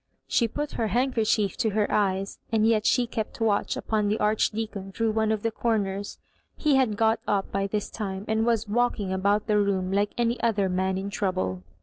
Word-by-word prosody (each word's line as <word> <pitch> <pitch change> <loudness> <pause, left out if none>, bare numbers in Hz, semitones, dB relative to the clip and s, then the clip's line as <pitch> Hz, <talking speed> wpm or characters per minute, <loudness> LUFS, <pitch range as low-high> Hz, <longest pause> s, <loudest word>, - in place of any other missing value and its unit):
She 235 - +2
put 295 +6 -4
her 225 - +2
handkerchief 225 -4 +1
to 220 - +1
her 210 - +3
eyes, 195 -1 0
and 220 -1 +3
yet 220 -1 +3
she 250 -2 +3
kept 225 -2 -5
watch 215 -3 +1
upon 215 -2 0
the 210 +2 +1
Archdeacon 210 -2 -1
through 225 +2 0
one 220 0 +1
of 215 -2 -1
the 230 - 0
comers. 205 -4 -1 0.4
He 300 -2 +2
had 250 -6 +2
got 225 0 +3
up 200 -2 0
by 195 0 0
this 210 0 -3
time, 195 -2 -4
and 220 0 +1
was 225 -2 +1
walking 210 -3 0
about 200 +2 +1
the 210 -1 +2
room 190 -2 0
like 200 +1 +1
any 240 0 0
other 205 -4 +1
man 185 +1 0
in 195 +1 -4
trouble. 185 - -1
210 Hz, 200 wpm, -26 LUFS, 195-225 Hz, 0.4 s, her